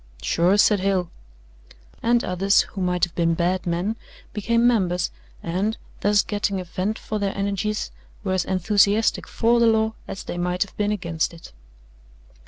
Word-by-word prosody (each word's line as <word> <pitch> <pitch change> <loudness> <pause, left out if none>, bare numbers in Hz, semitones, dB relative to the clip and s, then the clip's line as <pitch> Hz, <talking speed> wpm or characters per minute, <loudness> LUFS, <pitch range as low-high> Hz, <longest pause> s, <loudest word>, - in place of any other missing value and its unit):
"Sure," 180 +4 +3
said 205 0 +4
Hale. 185 -2 0 0.9
And 235 +1 +2
others, 195 +2 +3
who 195 - -7
might 180 -1 0
have 175 - +2
been 165 -1 +1
bad 180 +2 0
men, 180 +6 -1 0.4
became 230 +3 +1
members 180 -7 +2 0.3
and, 190 +6 -1 0.2
thus 205 0 +3
getting 205 -2 -1
a - - -4
vent 190 +5 -3
for 215 - -4
their 200 -1 -2
energies, 200 +2 -2 0.3
were 190 -2 -1
as 185 - +1
enthusiastic 205 +3 +2
for 235 +1 +2
the 235 - +5
law 220 0 +2
as 195 - -6
they 175 - -5
might 180 +1 0
have 200 - -16
been 210 0 0
against 170 -5 -2
it. 165 - -13
195 Hz, 165 wpm, -23 LUFS, 180-210 Hz, 0.9 s, the